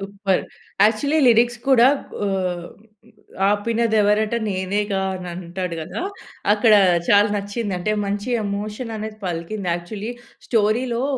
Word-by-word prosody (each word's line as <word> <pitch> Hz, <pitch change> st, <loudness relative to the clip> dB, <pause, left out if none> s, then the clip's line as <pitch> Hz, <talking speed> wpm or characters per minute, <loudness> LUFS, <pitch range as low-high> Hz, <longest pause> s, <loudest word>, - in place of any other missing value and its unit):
Super! 195 Hz, -1 st, -1 dB, 0.4 s
Actually 255 Hz, +9 st, +2 dB
lyrics 240 Hz, 0 st, +4 dB
కూడా 250 Hz, -3 st, +6 dB, 0.4 s
ఆహ్, 180 Hz, -3 st, -2 dB, 0.8 s
'అపినదేవరట 215 Hz, 0 st, +2 dB
నేనేగా' 195 Hz, +1 st, -1 dB
అనంటాడు 180 Hz, 0 st, -5 dB
కదా! 155 Hz, -, -5 dB, 0.5 s
అక్కడ 215 Hz, +1 st, +4 dB, 0.4 s
చాలా 205 Hz, +1 st, +5 dB
నచ్చిందంటే 205 Hz, -1 st, -2 dB
మంచి 205 Hz, +3 st, -3 dB, 0.2 s
ఎమోషననేది 215 Hz, +2 st, -5 dB
పలికింది. 180 Hz, +3 st, -4 dB
యాక్చువ‌ల్లీ 200 Hz, +6 st, -6 dB, 0.4 s
స్టోరీ‌లో 235 Hz, +2 st, +1 dB
205 Hz, 90 wpm, -21 LUFS, 190-220 Hz, 0.8 s, కూడా